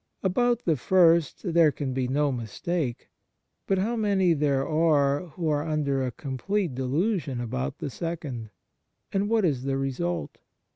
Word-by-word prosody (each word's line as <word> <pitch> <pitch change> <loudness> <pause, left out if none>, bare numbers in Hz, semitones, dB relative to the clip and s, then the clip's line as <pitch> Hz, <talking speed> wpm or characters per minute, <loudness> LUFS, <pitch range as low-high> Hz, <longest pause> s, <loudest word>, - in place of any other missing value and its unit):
About 240 +5 +1
the 160 -3 +2
first 170 - +3
there 165 -2 +6
can 135 -1 -4
be 130 -1 -1
no 145 +2 +1
mistake; 125 +3 -3 0.6
but 195 - +2
how 215 +6 0
many 200 -5 +2
there 140 -3 +1
are 155 -1 +2
who 165 +1 -4
are 150 -1 +1
under 150 -3 0
a 130 - 0
complete 155 - -2
de 130 +1 -3
lusion 150 - 0
about 70 - -3
the 140 - -5
second! 145 -9 -5 0.6
And 200 +1 +1
what 225 -3 +3
is 140 -7 +1
the 135 0 -1
result 165 +6 -3
155 Hz, 155 wpm, -26 LUFS, 135-180 Hz, 0.6 s, there